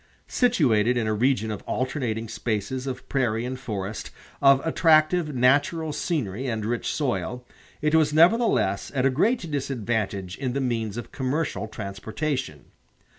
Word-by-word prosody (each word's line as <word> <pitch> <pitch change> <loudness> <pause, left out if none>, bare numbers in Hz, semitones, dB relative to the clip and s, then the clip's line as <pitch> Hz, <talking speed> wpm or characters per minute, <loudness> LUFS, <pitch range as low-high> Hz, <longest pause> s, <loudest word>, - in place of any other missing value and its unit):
Situated 125 - +2
in 115 - 0
a 110 - 0
region 110 -1 +1
of 105 - -5
alternating 125 -4 -2
spaces 115 +4 -3
of 130 -1 -5
prairie 120 -4 0
and 130 +1 -4
forest, 105 -4 -5 0.3
of 135 -1 +6
attractive 160 -1 +3
natural 145 +5 +2
scenery 130 - -2
and 110 -3 -2
rich 120 +1 -2
soil, 125 -3 -2 0.4
it 150 0 +2
was 155 -2 +4
nevertheless 155 - +3
at 130 -1 +1
a 135 - +4
great 175 - +1
disadvantage 110 -8 -2
in 130 -3 -2
the 140 - -1
means 115 -5 -2
of 120 - -7
commercial 135 -3 -2
transportation. 110 - -4
125 Hz, 140 wpm, -25 LUFS, 110-150 Hz, 0.4 s, of